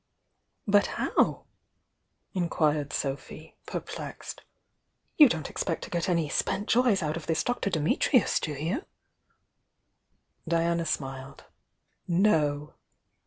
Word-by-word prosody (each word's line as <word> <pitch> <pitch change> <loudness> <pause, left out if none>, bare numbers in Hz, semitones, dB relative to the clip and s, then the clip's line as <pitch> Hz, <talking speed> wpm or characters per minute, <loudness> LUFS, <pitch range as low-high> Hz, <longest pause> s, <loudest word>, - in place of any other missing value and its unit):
"But 205 0 +4
how?" - - +1 1.3
inquired 145 -2 -4
Sophy, 140 +3 -5
perplexed. - - -6 0.7
"You 295 -4 +8
don 160 -5 -2
t - - -7
expect 165 -4 -2
to - - -8
get 170 +1 -1
any 170 -3 +1
'spent 195 +7 -1
joys' 235 -6 +3
out 155 +1 -1
of 165 - -8
this 160 -1 +1
Dr 245 -4 -1
Dmutnus, 195 - +2
do 150 - -3
you?" 165 - -2 1.6
Diana 170 0 +1
smiled. 135 -2 -4 0.6
"No!" 155 -6 +2
165 Hz, 110 wpm, -28 LUFS, 150-195 Hz, 1.6 s, You